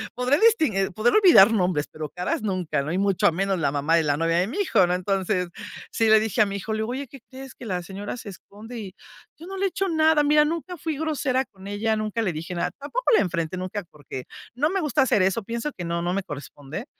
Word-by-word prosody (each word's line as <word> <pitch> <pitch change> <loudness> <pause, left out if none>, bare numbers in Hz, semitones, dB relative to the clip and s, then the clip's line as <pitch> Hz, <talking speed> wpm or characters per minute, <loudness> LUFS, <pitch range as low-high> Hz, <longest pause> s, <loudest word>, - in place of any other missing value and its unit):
podré 250 +4 +2
distin 425 - +4
eh, 195 0 0
podré 215 +6 +1
olvidar 335 - +7
nombres 180 -7 +1
pero 155 -1 -6
caras 180 +7 -3
nunca 185 -8 -1
y - - 0
mucho 195 -3 +2
menos 195 +1 0
la 145 -4 +1
mamá 145 +3 +1
de 165 - +2
la 145 -1 +1
novia 165 +1 +1
de 180 - +2
mi 245 - -6
hijo 375 - +3
¿no? 180 - 0
Entonces 185 0 -1 0.4
sí 225 -1 +2
le 220 0 +7
dije 220 -1 0
a - - +6
mi 200 0 -4
hijo, 215 +3 -4
le 215 - -2
digo: 220 +1 -2
"Oye 270 +2 -4
¿qué 275 - -13
crees? 265 0 -10
Que 250 - -11
la 185 -4 -2
señora 200 +5 -6
se 240 - -10
esconde 210 +5 -11
y 195 -3 -8 0.4
yo 335 - -10
no 385 - -6
le 390 - 0
he - - +2
hecho 390 +1 -2
nada. 315 -2 +4
Mira 300 +1 +5
nunca 335 +3 -3
fui 315 -1 -3
grosera 290 -4 0
con 195 -4 -14
ella 215 +2 0
nunca 215 +1 -2
le 185 - -1
dije 165 +4 -6
nada", 170 - -1
tampoco 470 - -1
la - - +6
enfrenté 170 -2 -2
nunca 185 +3 -4
porque 135 -3 -8 0.3
no 290 +5 +1
me 385 +2 -1
gusta 295 -3 +2
hacer 230 -6 +2
eso 190 +4 +1
pienso 235 +7 -3
que 175 - -5
no 170 0 -2
no 175 +1 -1
me 195 0 -1
corresponde. 145 - -8
205 Hz, 250 wpm, -24 LUFS, 180-270 Hz, 0.4 s, olvidar